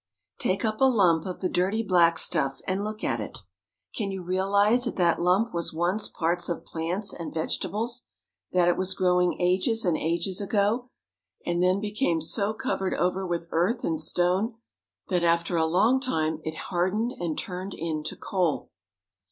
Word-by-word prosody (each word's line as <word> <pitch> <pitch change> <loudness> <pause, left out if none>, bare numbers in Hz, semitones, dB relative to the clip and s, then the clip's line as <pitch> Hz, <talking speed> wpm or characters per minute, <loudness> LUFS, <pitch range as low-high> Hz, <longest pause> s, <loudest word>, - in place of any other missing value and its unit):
Take 195 -3 0
up 215 +1 -2
a - - +7
lump 190 -10 +3
of 180 - -6
the 185 - +1
dirty 195 +6 0
black 175 -4 +4
stuff 135 -5 +1
and 190 +2 0
look 215 +1 -5
at - - 0
it. - - -6 0.6
Can 210 -4 -2
you 190 -2 -5
realize 200 +6 +2
that 240 - -2
that 170 -2 +2
lump 185 +7 +2
was 170 -1 -3
once 180 +6 0
parts 175 +2 -1
of 170 - -3
plants 175 +5 -2
and 170 - -6
vegetables? 225 +9 -2 0.5
that 180 -1 +3
it 175 - +3
was 190 0 -1
growing 180 -1 +2
ages 190 +5 +2
and 175 -3 +2
ages 170 +5 -1
ago, 210 +5 +1 0.6
and 175 0 0
then 185 +2 +3
became 205 -4 0
so 200 +6 0
covered 195 -3 -2
over 185 +2 0
with 170 -1 -2
earth 180 +9 +1
and 160 -1 -1
stone 180 +8 +1 0.5
that 180 -2 +1
after 170 +1 +2
a 160 -1 +2
long 215 +10 +3
time 160 - -1
it 160 0 -4 0.2
hard 180 +1 +1
ened 230 +3 0
and 170 -3 -2
turned 185 +1 -5
into 155 -2 -3
coal 180 -5 -1
185 Hz, 175 wpm, -27 LUFS, 170-205 Hz, 0.6 s, a